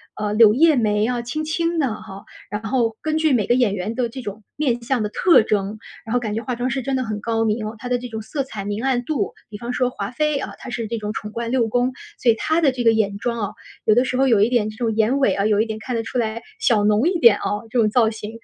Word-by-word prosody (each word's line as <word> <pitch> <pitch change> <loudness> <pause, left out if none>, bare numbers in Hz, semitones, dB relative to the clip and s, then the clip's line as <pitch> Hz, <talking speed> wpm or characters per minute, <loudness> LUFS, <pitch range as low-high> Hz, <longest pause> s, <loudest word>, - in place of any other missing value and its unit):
呃， 210 0 -2
柳 215 -1 +7
叶 310 +3 +4
眉 210 -2 +2
啊 245 0 -1
轻 245 +6 -4
轻 335 +2 -1
的 270 -8 +1
哈。 195 -2 -10 0.3
然 210 +2 -4
后 225 -1 0
根 310 0 -1
据 315 -3 +2
每 215 -5 +1
个 - - +4
演 240 -5 +2
员 205 +4 -4
的 250 -2 0
这 260 +3 -8
种 210 -1 -7
面 250 -5 0
相 240 -1 0
的 210 - -2
特 340 0 +5
征， 205 -1 -1 0.3
然 225 - -4
后 245 - +3
感 215 -2 -3
觉 225 - -2
化 250 0 -3
妆 245 +2 -2
师 260 +2 -2
真 265 +2 -2
的 260 - 0
很 215 -3 -4
高 225 +1 -1
明， 220 +1 0 0.2
它 245 +3 -7
的 250 - +2
这 250 - -6
种 220 -1 -6
色 280 +6 -3
彩 215 -6 -7
明 205 +2 -3
暗 255 -2 +1
度。 300 +3 -2 0.2
比 205 - -8
方 240 +3 -5
说 250 -1 +1
华 205 -5 -5
妃 300 +3 0
啊， - - -5
她 - - -9
是 230 -2 -3
这 230 +1 -3
种 210 -1 -4
宠 210 -1 -6
冠 230 +1 -4
六 245 -3 +2
宫， 245 +3 +1 0.3
所 240 - +4
以 225 - +1
她 320 +7 0
的 280 -4 +4
这 245 -2 -4
个 225 - +6
眼 200 -2 0
妆 235 +2 -2
啊， 205 - -2 0.3
有 215 - +4
的 245 +4 +3
时 255 - -2
候 265 +1 +3
有 230 -5 +4
一 210 - +5
点 235 -4 +1
这 215 - -11
种 225 -2 -1
眼 225 +5 +2
尾 270 - +3
啊， 200 - 0
有 210 -1 +3
一 220 - +3
点 220 -1 -5
看 240 +1 -3
得 - - 0
出 230 - -5
来 230 -1 -1 0.2
小 215 - +3
浓 215 +10 +3
一 360 - -1
点 235 -7 +7
啊， - - -8 0.3
这 245 - -2
种 220 -3 +4
造 225 0 +3
型。 220 +1 -8
230 Hz, 315 characters per minute, -21 LUFS, 215-255 Hz, 0.3 s, 柳